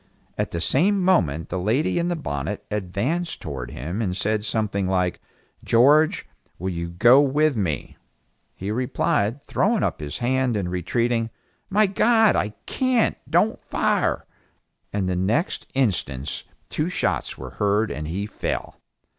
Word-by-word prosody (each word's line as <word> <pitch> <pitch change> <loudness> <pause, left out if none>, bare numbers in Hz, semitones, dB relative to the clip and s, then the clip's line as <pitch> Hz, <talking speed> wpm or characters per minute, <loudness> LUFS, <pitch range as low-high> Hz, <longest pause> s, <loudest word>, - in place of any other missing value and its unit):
At - - -1
the 85 - -3
same 190 - +3
moment 85 - +2
the 95 - -2
lady 120 - +1
in 170 - 0
the 175 - 0
bonnet 80 - -4
advanced 105 - -2
towards 65 -7 -6
him 85 - -4
and 90 -4 -1
said 105 +1 0
something 105 -3 -1
like, 90 -1 0 0.4
"George, 145 +7 +4 0.3
will 95 +2 -3
you 85 -1 -4
go 120 +10 +6
with 145 +1 +2
me?" 90 -9 -2 0.6
He 100 +2 -4
replied, 125 0 0
throwing 210 +3 +1
up - - -1
his 75 -1 -5
hand 125 -1 +1
and 90 -3 -2
retreating, 115 +6 0 0.4
"My 210 +2 +4
God 220 +3 +4
I 105 0 -1
can't, 255 -3 +1
don't - - +2
fire," - - 0 0.7
and 100 -2 -1
the 90 - 0
next 105 - 0
instants 80 - -1 0.3
two 155 +3 -1
shots 180 - -1
were 65 -1 -8
heard 105 0 +2
and 75 +1 -4
he 95 +6 -2
fell. 105 - -4
105 Hz, 145 wpm, -24 LUFS, 90-145 Hz, 0.7 s, go